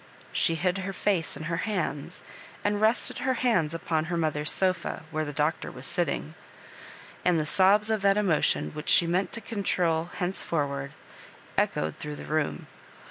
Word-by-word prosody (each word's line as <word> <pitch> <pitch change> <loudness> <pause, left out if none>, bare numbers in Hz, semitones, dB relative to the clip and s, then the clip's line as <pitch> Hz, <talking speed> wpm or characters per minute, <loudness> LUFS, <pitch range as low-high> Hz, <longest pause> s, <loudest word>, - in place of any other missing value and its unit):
She 165 -4 +2
hid 180 +3 0
her 195 +1 -4
face 180 -5 0
in - - -7
her 165 +2 -2
hands, 215 +2 -3 0.4
and 205 0 0
rested 220 +3 +2
her 260 0 +1
hands 185 -11 +1
upon 160 -1 -1
her 170 +1 -2
mo 160 -2 +1
ther's 150 0 -1
sofa, 185 -4 -1
where 155 0 -1
the 145 - -4
Doctor 150 +2 -1
was 125 - -8
sitting; 160 - -1 0.9
and 175 -2 +3
the 155 - 0
sobs 200 +6 +4
of 215 -2 +1
that 200 +1 +4
emotion 190 -7 +2
which 150 0 -6
she 170 - +6
meant 180 +3 0
to 230 - -3
con 220 -3 -4
trol 170 -3 +1
henceforward, 145 -6 -2 0.6
echoed 80 +1 0
through 150 0 -6
the - - -8
room. 155 -1 -1
170 Hz, 175 wpm, -28 LUFS, 155-195 Hz, 0.9 s, she